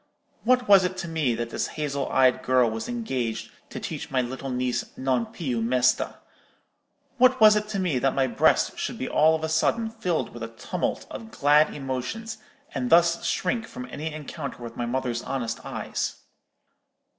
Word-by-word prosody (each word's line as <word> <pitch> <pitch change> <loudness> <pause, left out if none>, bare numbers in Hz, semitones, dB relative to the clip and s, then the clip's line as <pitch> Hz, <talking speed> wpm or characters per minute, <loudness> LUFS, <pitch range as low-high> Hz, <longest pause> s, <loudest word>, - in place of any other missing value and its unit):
What 250 +1 +3
was 200 -2 +7
it 185 +1 -2
to 185 -2 -4
me 155 -7 0
that 115 0 -4
this - - -1
hazel 140 -2 -2
eyed 130 -1 +4
girl 125 -3 +3
was 110 - -4
engaged 130 - -3 0.2
to - - -6
teach - - -5
my 130 - +1
little 130 +2 -3
niece 125 -1 -1
'Non 130 -3 0
più 125 -8 -3
mesta'? 125 +2 +2 1.0
what 255 +1 +5
was 215 -1 +8
it 210 0 0
to 210 -2 -3
me 170 -9 +1
that 135 +1 +1
my 135 - +3
breast 120 -4 +2
should - - -3
be - - -3
all 160 +1 +4
of 160 - -5
a - - +1
sudden 220 +8 +1
filled 200 -8 -2
with 120 - -9
a 115 - -3
tumult 125 +10 -3
of 225 - -7
glad 150 -3 +4
emotions, 135 - -4 0.3
and 125 -3 -2
thus 170 0 +4
shrink 225 +5 -1
from 250 +1 -7
any 155 +2 -4
encounter 150 -4 -7
with 115 -1 -7
my 120 - -3
mother's 120 -1 -1
honest 120 -4 -3
eyes? - - -3
140 Hz, 180 wpm, -26 LUFS, 125-185 Hz, 1.0 s, was